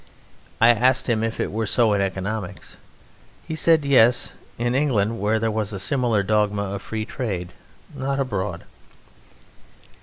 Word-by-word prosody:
I 115 - +6
asked 125 +2 +3
him 115 -3 +1
if 115 0 -3
it - - -2
were 110 +1 -2
so 115 0 +3
in 100 - +1
economics. 95 +1 -4 0.7
He - - -4
said: 160 -1 +3
Yes, 125 -3 +4 0.2
in 120 +1 -1
England, 115 -6 +1
where 105 +3 +1
there 110 0 0
was 105 -1 -2
a 100 - -4
similar 115 -1 +1
dogma 105 0 +1
of 100 0 -5
Free 110 -1 -4
Trade: 95 -10 -4 0.4
not 135 +1 -2
abroad. 100 -9 -3
110 Hz, 150 wpm, -23 LUFS, 100-125 Hz, 0.7 s, I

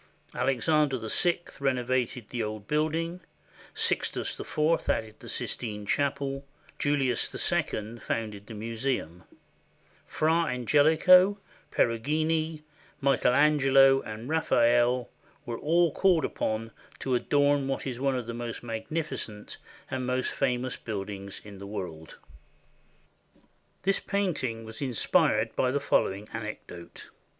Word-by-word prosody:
Alexander 140 +1 +2
VI 170 - +1 0.2
renovated 125 -3 -1
the 120 - -3
old 105 -1 -5
building; 160 +3 0 0.6
Sixtus - - -1
IV 155 +2 0
added 110 -1 -1
the - - -10
Sistine 105 -3 -3
Chapel; 140 +2 -1 0.4
Julius 135 -4 +1 0.2
II 110 +2 -2
founded 105 -3 -4
the 115 - -8
museum; 110 -6 -3 0.8
Fra 165 +2 +2
Angelico, 160 - +5 0.3
Peru 115 -1 +2
gino, 155 +4 0 0.4
Michael 135 -2 +3
Angelo, 135 -2 +5
and 110 +2 -7
Raphael 120 -5 +3 0.4
were 120 -2 -4
all 170 +2 +3
called 180 -5 +3
upon 110 +1 -2 0.3
to 130 - -2
adorn 145 +2 +2
what 135 - -2
is 125 -3 -4
one 135 0 +1
of 125 - -4
the 115 - -5
most 120 0 -5
magnificent 120 -2 -4 0.3
and 130 -1 -2
most 130 0 0
famous 130 -2 -1
buildings 100 -2 -5
in 100 -2 -10
the 100 - -8
world. 85 -6 -7 1.7
This 195 +1 +2
painting 150 - -2
was 110 +3 -7
inspired 125 -6 +2
by 130 - +2
the 140 +3 0
following 100 -6 +1
anecdote. 105 -6 -8
130 Hz, 115 wpm, -28 LUFS, 110-150 Hz, 1.7 s, Angelico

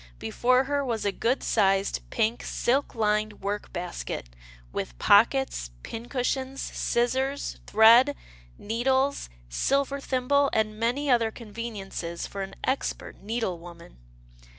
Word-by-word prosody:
Before 250 - +2
her 285 +1 -1
was 230 -5 -2
a 200 - +2
good 240 +6 0
sized 195 -2 +2
pink 225 +1 0
silk 270 +3 0
lined 215 -1 0
work 205 +1 -3
basket, 175 - -5 0.4
with - - -4
pockets, 220 - +3
pincushion, 260 +3 -3
scissors, 265 +3 -1
thread, 235 +6 +7 0.4
needles, 260 - 0 0.2
silver 275 - 0
thimble, 275 +1 +2
and 215 -1 0
many 245 +6 0
other 230 -2 +3
conveniences 210 -7 -6
for 200 - -6
an 195 0 -6
expert 265 - -2
needle 210 -4 -2
woman. 170 - -13
230 Hz, 115 wpm, -27 LUFS, 200-260 Hz, 0.4 s, thread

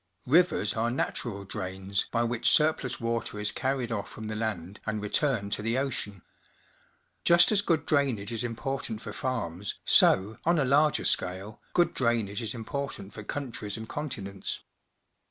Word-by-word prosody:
Rivers 155 - +3
are 115 +1 0
natural 115 -4 -3
drains 95 0 -3
by 120 0 +2
which 120 0 +2
surplus 150 -4 +2
water 115 -2 -2
is 105 +1 +1
carried 130 -1 -1
off 105 -1 -3
from 110 -1 -7
the 110 - -3
land 105 -4 -3
and 110 0 -1
re 105 0 -4
turned 115 -9 +1
to - - -1
the 115 +3 0
ocean. 110 -8 -2 1.0
Just 175 +3 +6
as 205 -2 +4
good 165 -6 +1
drainage 130 -8 +1
is 115 -1 -2
important 120 -1 -3
for - - -7
farms, 100 -7 -3
so, 100 +4 +5
on 170 +1 +3
a 145 - +2
larger 145 +3 +3
scale, 95 +4 0
good 175 -1 +3
drainage 115 -4 0
is 115 +1 -3
important 115 -4 -5
for 105 - -7
countries 115 -5 -4
and 110 0 -7
continents. 100 -10 -4
115 Hz, 160 wpm, -28 LUFS, 105-135 Hz, 1.0 s, Just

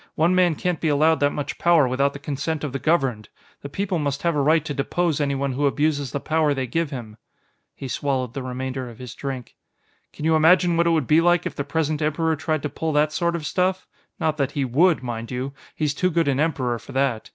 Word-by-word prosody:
One 170 +3 +3
man 180 -3 +3
can't 180 +1 -2
be 160 - 0
allowed 155 +2 +3
that 145 - +3
much 145 0 -5
power 170 -5 +4
without 140 +3 +1
the - - -6
consent 145 +2 -3
of 145 -4 -3
the 135 - -2
governed. 135 -10 0 0.3
The 140 - -7
people 190 +3 -2
must 145 -1 -2
have 170 -2 +1
a 145 - +2
right 155 +2 +3
to 145 - -3
depose 155 +2 0
anyone 140 -1 0
who 140 +3 +1
abuses 145 -2 0
the 140 - -2
power 155 -1 +1
they 130 -1 -1
give 165 +5 -1
him." 115 -6 -8 0.6
He 135 - -7
swallowed 130 -1 -2
the 135 - -4
remainder 130 0 -4
of 115 - -12
his 125 -2 -8
drink. 135 -4 -6 0.5
"Can 150 - -7
you 160 0 +4
imagine 175 +2 +5
what 170 0 +2
it - - +4
would 160 -4 +2
be 155 +6 +4
like 175 0 +3
if - - -3
the 140 - -2
present 155 +1 -1
Emperor 160 +1 +1
tried 155 0 -2
to - - 0
pull 160 +2 -3
that 150 +1 +2
sort 170 -1 0
of 160 -3 -4
stuff? 185 +3 0 0.3
Not 155 -1 0
that 140 -1 -1
he 140 -2 0
would, 155 +5 +3
mind 115 -2 -5
you; 130 +2 -4 0.2
he's 150 -2 0
too 185 +4 +1
good 170 -2 +1
an 135 -1 +1
Emperor 135 -7 0
for - - -12
that. 130 -4 0
145 Hz, 240 wpm, -23 LUFS, 135-160 Hz, 0.6 s, imagine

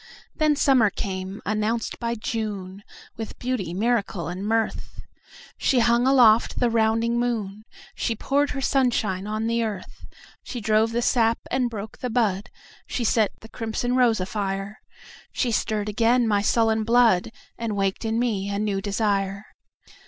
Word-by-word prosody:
Then 305 -1 +2
summer 265 -7 +4
came, 190 0 -5
announced 215 +2 -1
by 235 0 -2
June, 205 -4 -4 0.3
With 225 -1 -6
beauty, 245 -9 -2
miracle 200 -4 -1
and 180 +2 -5
mirth. 225 +1 -2 0.6
She 265 - +2
hung 235 +1 +3
aloft 240 -4 +5
the 240 -1 +2
rounding 225 +1 +2
moon, 215 -4 -2 0.3
She 230 - -2
poured 285 +6 +1
her 275 - -4
sunshine 225 -8 +1
on 215 +1 -2
the 230 +1 +1
earth, 210 -4 -6 0.3
She 245 - -6
drove 220 +1 +2
the 235 +1 -1
sap 230 -2 +3
and 250 -1 +1
broke 215 -1 -7
the 250 - -3
bud, 215 -5 0 0.4
She 245 - -2
set 220 -2 +2
the 225 - -11
crimson 230 +2 -2
rose 240 -4 +3
afire. 195 +1 -3 0.5
She 245 - -1
stirred 215 -1 -1
again 230 +3 +2
my 205 -2 +2
sullen 220 +1 +2
blood, 230 -4 +3 0.3
And 230 -3 -2
waked 195 +1 -1
in 225 0 -1
me 215 -5 -1
a 200 - -2
new 205 -2 -1
desire. 200 -1 -1
220 Hz, 150 wpm, -24 LUFS, 200-235 Hz, 0.6 s, aloft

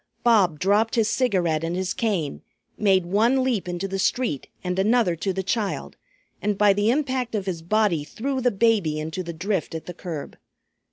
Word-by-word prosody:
Bob 205 -9 +4
dropped 205 +7 +2
his 225 -3 +3
cigarette 185 -10 +1
and 165 +1 -2
his 185 0 -1
cane, 190 -11 -1 0.3
made 190 -4 +3
one 230 +8 +2
leap 230 -8 -1
into 175 +2 -3
the 195 0 -3
street 225 - 0 0.2
and 180 0 -2
another 215 -3 +3
to 190 +4 -2
the 190 +1 -3
child, 205 +1 -2 0.5
and 205 -1 0
by 205 -1 +5
the 205 +2 +1
impact 255 -3 0
of 200 -3 -2
his 175 -4 -3
body 180 -3 +1
threw 260 - -3
the 250 - +3
baby 200 -8 +2
into 160 +4 -4
the 170 -1 -5
drift 180 0 -2
at 160 - -6
the 180 - -7
curb. 165 -4 -7
195 Hz, 185 wpm, -24 LUFS, 175-225 Hz, 0.5 s, by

